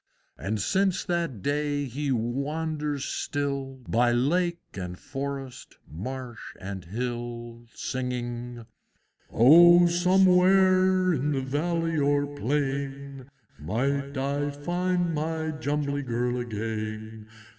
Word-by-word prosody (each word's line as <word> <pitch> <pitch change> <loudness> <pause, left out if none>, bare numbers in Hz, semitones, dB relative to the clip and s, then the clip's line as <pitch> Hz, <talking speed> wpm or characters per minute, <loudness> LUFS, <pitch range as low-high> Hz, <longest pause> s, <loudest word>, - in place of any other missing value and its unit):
And 105 +2 -3
since 190 - +1
that 170 - -2
day 145 0 0
he 140 +3 -3
wanders 145 +4 -2
still 140 -2 -3
By 120 +1 +3
lake 170 +8 +1 0.2
and 90 -2 -6
forest, 135 0 -6
marsh 125 - -6 0.2
and 95 -1 -6
hill, 120 +2 -5
Singing, 120 -2 -4 0.7
"O 175 +8 +8
somewhere, 185 +1 +4
in 140 -2 -1
valley 165 +3 0
or 145 0 +2
plain, 140 -1 -3 0.3
Might 140 - -1
I 140 +2 -1
find 175 +4 -1
my 160 +1 -2
Jumbly 145 -1 -2
Girl 125 -1 -1
again! 110 -1 -5
140 Hz, 95 wpm, -27 LUFS, 120-160 Hz, 0.7 s, O